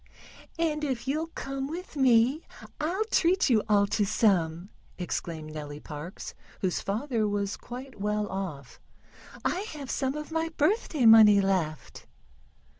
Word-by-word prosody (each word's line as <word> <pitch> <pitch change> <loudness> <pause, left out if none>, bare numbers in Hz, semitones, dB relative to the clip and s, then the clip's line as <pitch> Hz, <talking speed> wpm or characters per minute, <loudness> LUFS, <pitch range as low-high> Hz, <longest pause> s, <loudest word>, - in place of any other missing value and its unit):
"And 310 -2 0
if 260 -4 -2
you'll 310 +4 -1
come 270 0 -4
with 340 +2 -7
me 260 +2 +4 0.4
I'll 365 +8 -1
treat 360 -3 +3
you 220 -3 +4
all 205 -1 +5
to 205 +1 0
some," 190 -4 +1 0.3
exclaimed 160 -3 -4
Nellie 150 -1 -7
Parks, 150 +4 -8 0.3
whose 185 -2 0
father 225 +1 -1
was 205 -1 -1
quite 250 -2 -9
well 210 0 0
off. 175 -10 -6 0.7
"I 360 - +1
have 285 -3 -6
some 265 +1 -1
of 300 +1 -6
my 325 0 -1
birthday 310 - +1
money 220 -2 +8
left." 180 -7 -2
225 Hz, 135 wpm, -28 LUFS, 195-295 Hz, 0.7 s, money